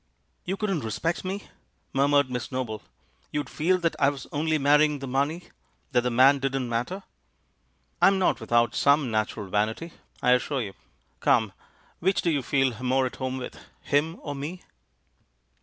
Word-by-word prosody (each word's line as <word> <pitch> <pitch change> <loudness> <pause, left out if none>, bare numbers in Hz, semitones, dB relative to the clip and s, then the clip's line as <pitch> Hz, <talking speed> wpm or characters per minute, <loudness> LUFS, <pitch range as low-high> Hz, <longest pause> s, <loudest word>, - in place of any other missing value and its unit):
"You 190 +2 -2
couldn't 195 -8 -1
respect 165 +10 -2
me?" 195 +2 -4 0.5
murmured 140 -1 +3
Miss 125 +2 -4
Noble. 125 -4 -3 0.5
"You'd 145 - -3
feel 180 +4 +2
that 165 -1 +1
I 140 -1 +5
was 140 -3 -6
only 155 +2 +1
marrying 150 +1 +4
the 135 - -6
money 140 +6 -1 0.2
— - - -41
that 125 - +3
the 125 - 0
man 130 +4 +5
didn't 135 -1 -1
matter?" 125 +12 -2 1.0
"I - - +8
am 195 0 +4
not 185 - +2
without 120 0 +2
some 140 -3 +3
natural 110 -1 -1
vanity, 110 - -1 0.3
I 125 - +3
as 125 - +3
sure 140 -2 -2
you. 105 -5 -4 0.5
Come, 110 -3 +2 0.5
which 190 +2 +1
do 170 - +2
you 145 -3 +1
feel 130 -3 0
more 130 +1 +2
at 125 - -5
home 130 0 -3
with, 125 - -7 0.2
him 150 +3 +1
or 145 - -5
me?" 150 +6 -6
140 Hz, 175 wpm, -26 LUFS, 125-155 Hz, 1.0 s, I